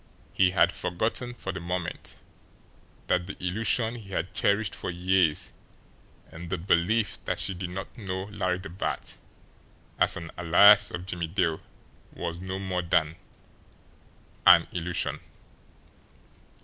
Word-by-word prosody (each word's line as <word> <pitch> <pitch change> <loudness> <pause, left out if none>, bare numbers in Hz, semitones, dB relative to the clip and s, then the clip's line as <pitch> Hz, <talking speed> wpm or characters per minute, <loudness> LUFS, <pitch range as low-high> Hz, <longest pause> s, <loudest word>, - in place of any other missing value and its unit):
He 95 -1 +4
had 90 - +3
forgotten 115 +7 -3
for 95 - -5
the 95 - -6
moment 90 0 -5 0.9
that 90 -1 0
the 100 - -7
illusion 110 +5 +1
he 110 -5 -10
had 95 -1 -3
cherished 100 0 +1
for - - -5
years 90 -2 +1 0.8
in 85 +2 -9
the 90 - -1
belief 100 +5 +1
that - - -2
she - - -1
did 90 0 -5
not 95 +2 -7
know 95 -4 -4
Larry 95 -3 -2
the 95 -2 -9
Bat 90 +4 -5 0.8
as - - +5
an 85 -1 -8
alias 95 +5 +7
of 85 +1 -6
Jimmie 90 -3 -3
Dale 80 -2 0 0.5
was 85 0 -5
no 95 +1 -5
more 95 -2 -2
than 85 -2 +1 1.3
an - - +8
illusion. 85 -2 -2
90 Hz, 135 wpm, -27 LUFS, 85-100 Hz, 1.3 s, an